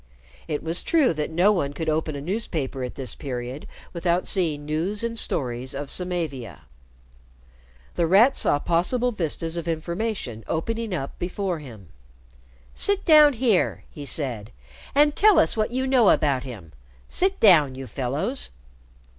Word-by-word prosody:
It 150 Hz, -3 st, -3 dB
was 165 Hz, +2 st, -1 dB
true 310 Hz, -, +3 dB
that 150 Hz, -1 st, -3 dB
no 175 Hz, +6 st, +3 dB
one 145 Hz, -8 st, -1 dB
could 160 Hz, +2 st, -5 dB
open 155 Hz, -1 st, -1 dB
a 140 Hz, -, -5 dB
newspaper 155 Hz, -, -3 dB
at 125 Hz, -, -5 dB
this 130 Hz, -2 st, -4 dB
period 130 Hz, 0 st, -6 dB, 0.3 s
without 175 Hz, +1 st, 0 dB
seeing 155 Hz, -6 st, -1 dB
news 170 Hz, +8 st, -2 dB
and 235 Hz, 0 st, -2 dB
stories 130 Hz, -, -3 dB
of 140 Hz, 0 st, -5 dB
Samavia. 160 Hz, -, -3 dB, 1.3 s
The 170 Hz, -, +1 dB
Rat 220 Hz, +10 st, +5 dB
saw -, -, +2 dB
possible 185 Hz, -, 0 dB
vistas 165 Hz, -4 st, -3 dB
of 170 Hz, 0 st, -4 dB
information 170 Hz, -, -3 dB
opening 225 Hz, +7 st, -2 dB
up 140 Hz, -7 st, -4 dB
before 180 Hz, -1 st, -2 dB
him. 110 Hz, -, -12 dB, 0.8 s
"Sit 405 Hz, -1 st, 0 dB
down 305 Hz, -3 st, +7 dB
here," 230 Hz, -6 st, +1 dB
he 145 Hz, -3 st, -9 dB
said, 120 Hz, -8 st, -3 dB, 0.5 s
"and 295 Hz, +1 st, +4 dB
tell 425 Hz, -1 st, +5 dB
us 160 Hz, -, +3 dB
what 215 Hz, -1 st, 0 dB
you 260 Hz, +2 st, -1 dB
know 255 Hz, -5 st, +4 dB
about 140 Hz, -4 st, +2 dB
him. 105 Hz, -11 st, -9 dB, 0.4 s
Sit 380 Hz, +1 st, 0 dB
down, 155 Hz, -11 st, +6 dB
you 135 Hz, 0 st, -7 dB
fellows." 140 Hz, -, -3 dB
165 Hz, 150 wpm, -24 LUFS, 140-215 Hz, 1.3 s, down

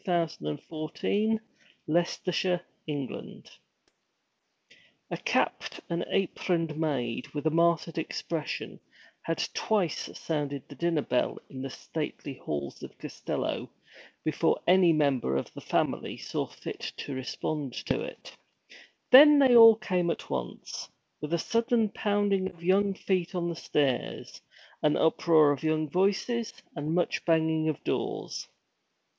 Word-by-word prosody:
WHAT 170 Hz, -3 st, +1 dB
HAPPENED 75 Hz, 0 st, -3 dB
TO 155 Hz, -1 st, -5 dB
ALANNA 220 Hz, +2 st, +2 dB, 0.4 s
BY 165 Hz, +3 st, +3 dB
KATHLEEN 175 Hz, -5 st, -2 dB
NORRIS -, -, -10 dB, 1.5 s
A -, -, -2 dB
CAPPED -, -, -1 dB
and 170 Hz, 0 st, 0 dB
aproned 170 Hz, -4 st, 0 dB
maid, 140 Hz, -7 st, -1 dB
with 145 Hz, -, -3 dB
a 160 Hz, -, +3 dB
martyred 165 Hz, 0 st, +2 dB
expression, 160 Hz, 0 st, -4 dB, 0.4 s
had 165 Hz, -, -1 dB
twice 200 Hz, -8 st, 0 dB
sounded 145 Hz, -4 st, -3 dB
the -, -, -10 dB
dinner 170 Hz, -3 st, 0 dB
bell 125 Hz, -, 0 dB
in 130 Hz, -2 st, -7 dB
the 135 Hz, -, -4 dB
stately 150 Hz, 0 st, -5 dB
halls 70 Hz, -, -5 dB
of -, -, -10 dB
Costello, -, -, -4 dB, 0.5 s
before 155 Hz, +1 st, +1 dB
any 180 Hz, -1 st, +6 dB
member 140 Hz, -, +2 dB
of -, -, -4 dB
the -, -, -9 dB
family -, -, -1 dB
saw -, -, -3 dB
fit -, -, -8 dB, 0.2 s
to 140 Hz, -, -5 dB
respond 135 Hz, +2 st, -3 dB
to -, -, 0 dB
it. -, -, -8 dB, 0.8 s
Then 295 Hz, +3 st, +10 dB
they 265 Hz, -3 st, +6 dB
all 225 Hz, -1 st, +10 dB
came 180 Hz, -5 st, 0 dB
at -, -, -4 dB
once, -, -, -5 dB, 0.3 s
with 150 Hz, +1 st, -5 dB
a 170 Hz, -, +3 dB
sudden 230 Hz, +3 st, +1 dB
pounding 205 Hz, -2 st, +1 dB
of 170 Hz, -2 st, -17 dB
young 195 Hz, +2 st, +3 dB
feet 185 Hz, -2 st, -1 dB
on 175 Hz, -1 st, -1 dB
the 170 Hz, -, -3 dB
stairs, 140 Hz, -6 st, -1 dB, 0.4 s
an 150 Hz, -1 st, +3 dB
uproar 160 Hz, -2 st, +4 dB
of 140 Hz, -, -2 dB
young 155 Hz, 0 st, +1 dB
voices, 200 Hz, -, 0 dB, 0.2 s
and 155 Hz, +1 st, -2 dB
much 175 Hz, -, 0 dB
banging 160 Hz, -1 st, +2 dB
of 155 Hz, -, -3 dB
doors. -, -, -3 dB
165 Hz, 135 wpm, -29 LUFS, 150-185 Hz, 1.5 s, Then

